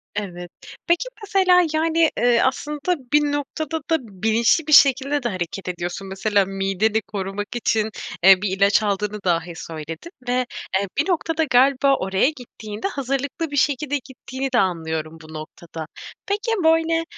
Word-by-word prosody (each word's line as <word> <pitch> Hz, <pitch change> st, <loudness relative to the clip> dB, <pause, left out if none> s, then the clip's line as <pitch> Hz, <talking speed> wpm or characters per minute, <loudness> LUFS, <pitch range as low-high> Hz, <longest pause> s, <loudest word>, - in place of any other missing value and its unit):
Evet, 175 Hz, -4 st, -5 dB, 0.4 s
peki, 345 Hz, +7 st, +2 dB, 0.2 s
mesela, 370 Hz, -3 st, +4 dB
yani, 325 Hz, 0 st, +3 dB
eee, 240 Hz, -1 st, +3 dB
aslında 300 Hz, +6 st, 0 dB, 0.2 s
bir 295 Hz, -, +6 dB
noktada 310 Hz, +3 st, -3 dB
da 325 Hz, -, +5 dB
bilinçli 225 Hz, -, +1 dB
bir 305 Hz, -, +1 dB
şekilde 275 Hz, 0 st, +5 dB
de 240 Hz, -, 0 dB
hareket 185 Hz, 0 st, -5 dB
ediyorsun. 180 Hz, +2 st, -4 dB
Mesela 200 Hz, +1 st, +1 dB
mideni 195 Hz, +3 st, 0 dB
korumak 200 Hz, 0 st, -5 dB
için, 220 Hz, -2 st, 0 dB, 0.3 s
eee, 190 Hz, -1 st, +7 dB
bir 195 Hz, -2 st, -1 dB
ilaç 200 Hz, +2 st, +4 dB
aldığını 210 Hz, +1 st, -1 dB
dahi 170 Hz, -1 st, 0 dB
söyledin. 165 Hz, -, -8 dB, 0.2 s
Ve, 250 Hz, 0 st, +1 dB, 0.3 s
eee, 200 Hz, -, -2 dB
bir 305 Hz, +7 st, +1 dB
noktada 325 Hz, -2 st, 0 dB
galiba 275 Hz, +1 st, +4 dB
oraya 190 Hz, +6 st, +1 dB
gittiğinde 220 Hz, -, -7 dB
hazırlıklı 280 Hz, +1 st, -3 dB
bir -, -, -4 dB
şekilde 290 Hz, +1 st, +1 dB
gittiğini 265 Hz, +1 st, -6 dB
de 240 Hz, -, +4 dB
anlıyorum 160 Hz, -3 st, -2 dB
bu 155 Hz, 0 st, -13 dB
noktada. 160 Hz, +1 st, -8 dB, 0.4 s
Peki, 420 Hz, +4 st, -1 dB
böyle, 325 Hz, 0 st, +3 dB
235 Hz, 145 wpm, -22 LUFS, 195-295 Hz, 0.4 s, eee